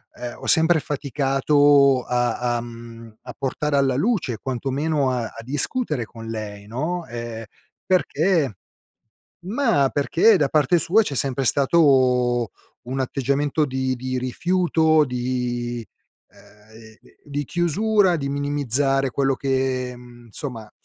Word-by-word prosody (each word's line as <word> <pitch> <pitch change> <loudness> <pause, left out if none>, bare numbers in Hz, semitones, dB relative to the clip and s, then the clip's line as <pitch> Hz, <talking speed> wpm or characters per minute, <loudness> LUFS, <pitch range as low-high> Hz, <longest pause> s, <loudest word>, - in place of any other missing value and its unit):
ehm, 120 -1 -7
ho - - -10
sempre 160 0 +4
faticato 140 -1 +2
a 120 0 0
a - - -3
mhmm, 115 -1 -11
a 125 - -8
portare 145 +2 -2
alla 135 -2 +2
luce, 165 - 0
quantomeno 135 +2 -1
a 125 -2 -1
a 115 - -9
discutere 145 - -2
con 115 0 -11
lei, 105 -2 -6
no, 160 +10 -3
ehm, 115 -1 -6 0.4
perché 165 - +1 0.9
ma 215 - +1
perché 170 +9 +4
da 145 -5 +1
parte 150 +3 +3
sua, 175 +8 +3
c'è 150 - -4
sempre 135 0 -1
stato 130 - +3 0.4
un 130 +2 -4
atteggiamento 140 +3 0
di 130 -1 -1
di 130 +1 -3
rifiuto, 160 +3 +2
di 120 -2 -3 0.4
ehm, 110 +2 -18 0.3
di 145 0 -4
chiusura, 185 +4 +2
di 140 -3 -3
minimizzare 140 -1 0
quello 135 +1 0
che 130 -2 -1
insomma, 120 0 -9
ehm, 105 - -16
135 Hz, 125 wpm, -22 LUFS, 120-150 Hz, 0.9 s, sempre